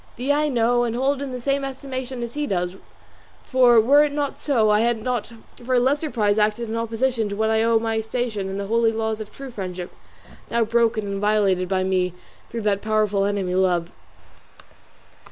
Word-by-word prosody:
Thee 265 +4 0
I 300 +1 +1
know 240 -2 +2
and 235 -1 -2
hold 270 +2 0
in 280 -2 -4
the 250 - -5
same 275 +3 0
estimation 260 -2 -5
as 235 0 -6
he 295 0 -2
does, 180 -1 -2 0.7
for 250 -3 +5
were 280 +7 +5
it 295 - 0
not 285 -1 -3
so 230 -7 +2
I 210 - +4
had 235 +1 +2
not 245 -2 -2 0.3
for 255 +1 0
a - - +5
lesser 285 +5 +1
prize 210 -3 +1
acted 215 +2 +1
in 225 - -3
opposition 230 0 -1
to 200 - -4
what 220 +1 +1
I 220 0 +2
owe 230 0 +3
to 225 - -2
my 225 -1 0
station 220 -3 -3
and 195 +1 -4
the 200 - -3
holy 230 +2 +2
laws 220 -1 -2
of 215 - -8
true 275 -1 -9
friendship, 185 -4 -6 0.6
now 235 0 +2
broken 225 -1 +1
and 200 0 -4
violated 200 -4 +2
by 190 -1 +1
me 185 -1 0 0.3
through 230 - -4
that 205 -2 0
powerful 215 -2 +1
enemy, 200 -3 -1
love." 180 -2 +1
225 Hz, 205 wpm, -23 LUFS, 205-250 Hz, 0.7 s, for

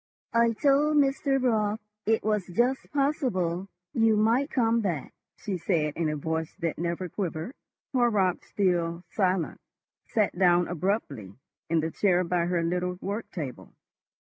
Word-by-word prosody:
"I 230 0 +4
told 290 +4 +3
Mr. 275 -1 +2
Raut 220 -4 +1 0.3
it 225 0 +2
was 210 -3 0
just 240 +9 0
possible 240 - 0 0.3
you 225 -2 +3
might 235 +7 +2
come 230 -2 +2
back," 170 -9 -3 0.2
she 200 -5 -3
said, 155 -4 0
in 165 -2 0
a 150 - -1
voice 160 +2 -3
that 165 -5 -2
never 170 +2 -2
quivered. 175 - -4 0.4
Horrocks, 215 -8 +2
still 175 -3 0
silent, 185 -4 0 0.5
sat 215 -3 +1
down 175 -1 +4
abruptly 175 - -2 0.3
in 165 -1 +2
the 160 +1 -2
chair 180 -1 +2
by 175 -1 0
her 175 -1 0
little 180 +1 -1
work 205 +4 -4
table. 145 -9 -7
190 Hz, 140 wpm, -27 LUFS, 170-230 Hz, 0.5 s, I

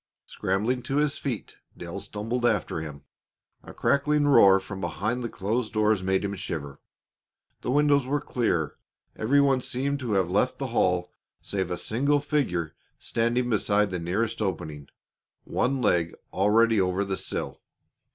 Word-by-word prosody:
Scrambling 110 +7 -1
to 135 - -3
his 150 0 +1
feet, 125 -7 -4 0.2
Dale 85 +3 -6
stumbled 105 +5 -4
after 100 -8 +1
him. 75 -3 -8 0.6
A - - -11
crackling 145 +1 +2
roar 100 -9 +7
from 95 0 -8
behind 110 +8 -2
the 115 - -3
closed 110 +4 -2
doors 110 -2 +2
made 95 +1 0
him 100 - -2
shiver. 75 -7 -5 0.8
The - - -4
windows 145 -1 +3
were 145 +2 +1
clear. 85 - -1 0.4
Every 135 +6 +2
one 135 -2 +3
seemed 140 +3 -1
to 120 -5 -2
have 95 -3 +2
left 105 +8 +1
the 140 - -3
hall 90 -4 +1 0.3
save 95 -3 -2
a 90 - -2
single 140 +9 +1
figure 130 - -1 0.2
standing 120 +2 0
beside 105 -1 +2
the 90 - -2
nearest 105 +7 -1
opening, 75 -8 -3 0.6
one 135 +1 0
leg 85 -1 +2 0.2
already 110 +2 +4
over 95 +2 0
the 95 0 -2
sill. - - -4
105 Hz, 150 wpm, -26 LUFS, 95-125 Hz, 0.8 s, roar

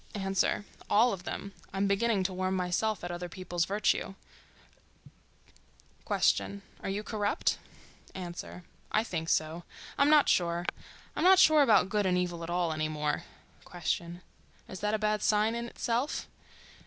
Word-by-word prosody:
A.—All 205 +3 +1
of 185 -1 -7
them. 200 0 -5 0.2
I'm 195 +1 0
beginning 200 0 +2
to 185 0 -1
warm 185 +1 -1
myself 185 +3 -1
at 175 - -4
other 175 0 -5
people's 175 -1 -2
virtue. 200 -1 0 1.9
Q.—Are 200 -1 0
you 200 +2 -2
corrupt? 215 - 0 0.6
A.—I 180 +3 -5
think 165 -7 -4
so. 160 +2 0 0.4
I'm 280 +1 +5
not 300 -1 +6
sure. 175 0 +1 0.5
I'm - - -1
not 375 +1 +7
sure 310 -4 +7
about 220 -8 +5
good 205 -1 +1
and 180 -1 +2
evil 175 -2 -2
at 165 - -6
all 175 -2 0
any 155 0 -1
more. 150 -1 -2 0.4
Q.—Is 175 +2 -6
that 210 +1 0
a - - +1
bad 215 0 0
sign 215 +1 +2
in 235 0 -3
itself? 240 +4 -2
195 Hz, 140 wpm, -30 LUFS, 175-215 Hz, 1.9 s, not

